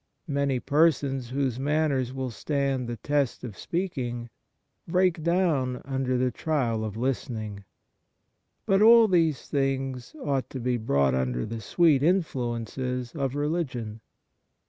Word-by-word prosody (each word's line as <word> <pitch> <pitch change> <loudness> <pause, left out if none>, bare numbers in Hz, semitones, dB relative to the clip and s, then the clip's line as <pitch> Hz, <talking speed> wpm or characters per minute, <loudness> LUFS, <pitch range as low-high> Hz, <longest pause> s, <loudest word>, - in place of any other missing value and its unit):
Many 140 -3 0
persons 140 -4 +2
whose 130 -2 -1
manners 140 -3 +1
will 130 -1 -4
stand 135 0 -1
the 120 0 -4
test 145 +2 -1
of 115 -6 -6
speak 175 - -3
ing, 120 -1 -4 0.6
break 180 -1 +2
down 155 -7 +1
under 130 -1 -1
the 125 0 +1
trial 120 -6 -1
of 110 -1 -5
listening. 110 -5 -3 1.0
But 195 +1 +3
all 230 +1 +8
these 165 -6 +1
things 135 - -2
ought 140 - -1
to 130 - -6
be 125 0 0
brought 70 - +2
under 65 -2 -1
the 115 0 -5
sweet 150 - +3
influences 125 - -1
of 135 -3 -2
religion. 135 -8 -2
135 Hz, 130 wpm, -27 LUFS, 120-150 Hz, 1.0 s, all